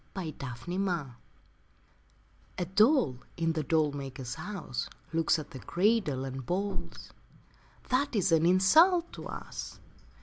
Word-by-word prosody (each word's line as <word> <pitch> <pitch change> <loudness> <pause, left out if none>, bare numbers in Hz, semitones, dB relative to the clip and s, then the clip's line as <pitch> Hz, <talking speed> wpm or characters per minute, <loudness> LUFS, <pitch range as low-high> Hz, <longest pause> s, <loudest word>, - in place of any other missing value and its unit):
II 170 -5 -3
THE 130 -5 -7 0.2
DOLLS 175 -9 -1 1.5
A 180 - -1
doll 200 - +3 0.2
in 165 -1 +1
the 160 - -1
doll 155 0 +2
maker's 135 -3 -6
house 180 - -5 0.2
Looks 165 0 +3
at 155 - -7
the 130 - -8
cradle 175 - +1
and 135 0 -5
balls: 195 +8 -4 0.7
'That 260 +1 +1
is 195 -3 +2
an 165 0 +4
insult 325 - +5
to - - -7
us.' - - -7
165 Hz, 130 wpm, -30 LUFS, 140-200 Hz, 1.5 s, insult